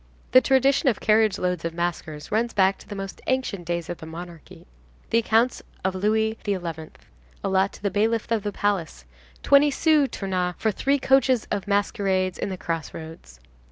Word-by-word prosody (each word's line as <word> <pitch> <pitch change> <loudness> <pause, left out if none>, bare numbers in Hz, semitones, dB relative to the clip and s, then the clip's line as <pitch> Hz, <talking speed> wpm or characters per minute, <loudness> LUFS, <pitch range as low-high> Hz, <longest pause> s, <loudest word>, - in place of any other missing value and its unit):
The 255 - +8
tradition 270 +1 +3
of 230 - -1
carriage 215 -2 +3
loads 180 -2 -2
of 165 0 -3
maskers 165 -3 -4
runs 230 +3 0
back 190 0 +3
to - - -15
the 205 - -7
most 195 -1 -7
ancient 255 -9 -1
days 170 -1 -2
of 175 - -6
the 160 - -9
monarchy. 170 0 -10 0.5
The 230 - +4
accounts 230 +2 +2 0.2
of 190 - +1
Louis 220 +3 0
XI. 200 -2 0 0.9
allot 195 0 +1
to - - -14
the 200 - 0
bailiff 220 +3 0
of 225 -2 +2
the 205 0 -3
palace 190 - -2 0.4
"twenty 280 +1 +6
sous, 300 0 +3
Tournois, 185 -4 -2
for 220 - +1
three 275 +7 +1
coaches 265 -3 +3
of 200 - -2
mascarades 195 -2 0
in - - -2
the 190 - -4
crossroads." 160 - -6
200 Hz, 175 wpm, -24 LUFS, 180-230 Hz, 0.9 s, The